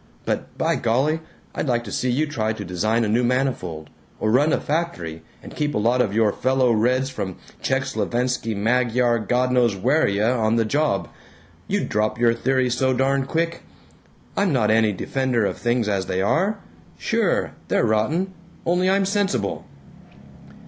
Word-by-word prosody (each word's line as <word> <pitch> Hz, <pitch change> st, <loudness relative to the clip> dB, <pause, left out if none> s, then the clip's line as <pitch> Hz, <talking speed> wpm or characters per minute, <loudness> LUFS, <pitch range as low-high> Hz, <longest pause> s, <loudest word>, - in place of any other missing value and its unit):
But, -, -, -3 dB
by -, -, +1 dB
golly, 135 Hz, +8 st, +1 dB, 0.3 s
I'd -, -, -3 dB
like 120 Hz, -2 st, +1 dB
to 100 Hz, -, -8 dB
see 130 Hz, -, -1 dB
you 140 Hz, +6 st, +1 dB
try 110 Hz, -8 st, -2 dB
to -, -, -7 dB
design 110 Hz, +7 st, 0 dB
a -, -, 0 dB
new 115 Hz, +4 st, +2 dB
manifold, 120 Hz, -, -1 dB, 0.3 s
or 110 Hz, -, +1 dB
run 145 Hz, +6 st, +4 dB
a -, -, +2 dB
factory 115 Hz, -, -3 dB, 0.2 s
and -, -, -10 dB
keep 150 Hz, -2 st, -1 dB
a -, -, +2 dB
lot 120 Hz, +4 st, +2 dB
of 110 Hz, -, 0 dB
your 110 Hz, -1 st, +2 dB
fellow 130 Hz, -1 st, +2 dB
reds 125 Hz, +4 st, +1 dB
from 100 Hz, -7 st, -4 dB, 0.3 s
Czech -, -, +1 dB
slovenski 120 Hz, -2 st, -1 dB
magyar 120 Hz, +2 st, +2 dB
godknowswheria 125 Hz, -1 st, +2 dB
on 110 Hz, 0 st, +2 dB
the 115 Hz, -1 st, +2 dB
job! 145 Hz, -3 st, 0 dB, 0.6 s
You'd -, -, -1 dB
drop 105 Hz, +1 st, 0 dB
your 120 Hz, -1 st, +3 dB
theories 130 Hz, +1 st, +1 dB
so 130 Hz, +1 st, +1 dB
darn 135 Hz, +1 st, +1 dB
quick! 165 Hz, +2 st, -1 dB, 0.7 s
I'm 200 Hz, -3 st, +2 dB
not 110 Hz, -6 st, +2 dB
any 110 Hz, -1 st, +4 dB
defender 125 Hz, +2 st, -1 dB
of -, -, -3 dB
things 120 Hz, -2 st, 0 dB
as 100 Hz, -2 st, -1 dB
they 95 Hz, -, -1 dB
are. 190 Hz, -, +1 dB, 0.4 s
Sure. -, -, 0 dB, 0.2 s
They're -, -, +2 dB
rotten. 155 Hz, -, 0 dB, 0.3 s
Only 180 Hz, +2 st, +2 dB
I'm 195 Hz, 0 st, +3 dB
sensible." 200 Hz, 0 st, -1 dB
125 Hz, 165 wpm, -22 LUFS, 110-135 Hz, 0.7 s, run